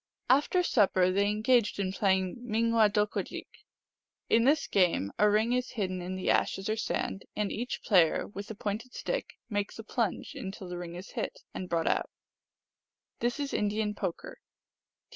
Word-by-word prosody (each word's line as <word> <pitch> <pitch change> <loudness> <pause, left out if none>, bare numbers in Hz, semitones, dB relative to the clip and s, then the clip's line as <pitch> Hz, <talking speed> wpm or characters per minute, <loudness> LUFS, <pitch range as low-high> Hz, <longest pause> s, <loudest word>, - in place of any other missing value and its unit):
After 295 +7 +3
supper 190 - +3
they 200 +2 +2
engaged 215 +1 +2
in 190 -2 -1
playing 190 -2 +1
Ming 230 -1 0
wadokadjik. 210 -2 +1 0.9
In 230 +1 +5
this 300 +4 +4
game 175 - +2
a 210 - +6
ring 220 +3 +2
is 250 0 -1
hidden 185 -5 -2
in 180 +1 -4
the 185 - +1
ashes 195 - +1
or 215 - +1
sand, 205 -2 -2
and 210 -1 -1
each 245 +3 -4
player, 175 -6 +4
with 200 0 -8
a 220 - -5
pointed 215 +5 -4
stick, - - -3
makes 205 -3 -2
a 225 - -7
plunge 225 -3 -2
until 190 -1 -7
the 175 0 -5
ring 175 -1 -6
is 180 +3 -9
hit, - - -4
and 185 - -5
brought 165 -1 0
out. - - +1 1.1
(This 240 +4 -1
is 285 -1 -3
Indian 210 0 0
poker. 200 - -5
210 Hz, 165 wpm, -30 LUFS, 190-230 Hz, 1.1 s, a